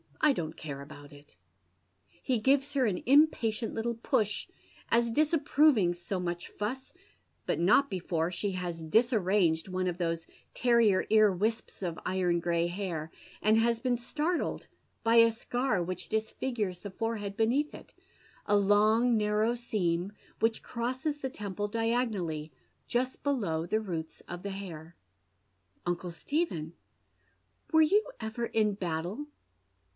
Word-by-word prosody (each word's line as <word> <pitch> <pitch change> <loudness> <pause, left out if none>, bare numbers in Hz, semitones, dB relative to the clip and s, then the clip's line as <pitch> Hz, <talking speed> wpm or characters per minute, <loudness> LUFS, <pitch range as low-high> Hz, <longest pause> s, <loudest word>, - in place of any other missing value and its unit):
I 300 -2 +5
don't 160 -7 -4
care 140 -3 -6
about 145 0 -12
it." 145 0 -16 0.7
He 245 - -2
gives 270 +4 +2
her 270 -3 +2
an 185 -4 -2
impatient 250 -5 +3
little 235 +1 -1
push, 225 -2 0 0.4
as 235 0 +3
disapproving 290 - +3
so 175 +2 -4
much 175 -1 -3
fuss, 255 +6 -5 0.5
but - - 0
not 210 +11 +4
before 175 -3 -1
she 195 +3 -1
has 175 -2 -4
disarranged 190 -3 +2
one 185 0 -1
of 175 -1 -2
those 165 -2 -2 0.3
terrier 235 -6 +4
ear 215 -1 +6
wisps 215 +2 -2
of 170 -3 -3
iron 180 -2 +1
gray 170 0 +1
hair, 175 -4 -4 0.3
and 225 +2 +3
been 250 -1 +2
startled 310 +8 -2 0.4
by 230 0 +3
a 230 0 +8
scar 240 -3 -1
which 180 +1 -5
dis 220 0 -1
figures 210 -9 -3
the 205 +1 -8
forehead 210 -2 -3
beneath 245 +7 +1
it, - - -12 0.5
a 205 - +4
long 215 +4 +4
narrow 210 +2 +2
seam, 195 -6 -1 0.3
which 225 0 +1
crosses 260 +5 -3
the 265 - -3
temple 205 -3 -4
diagonally 210 -9 -1 0.4
just 255 +2 -1
below 195 - 0
the 215 +5 +1
roots 165 -7 -5
of 175 0 -8
the 200 - -3
hair. 170 -4 -8 0.4
" 95 -1 -43
Uncle 175 0 -2
Stephen, 170 - -2 1.0
were 320 -1 +6
you 405 +8 +4 0.2
ever 220 +2 -3
in 215 -2 +1
battle 180 - -3
210 Hz, 140 wpm, -30 LUFS, 175-235 Hz, 1.0 s, a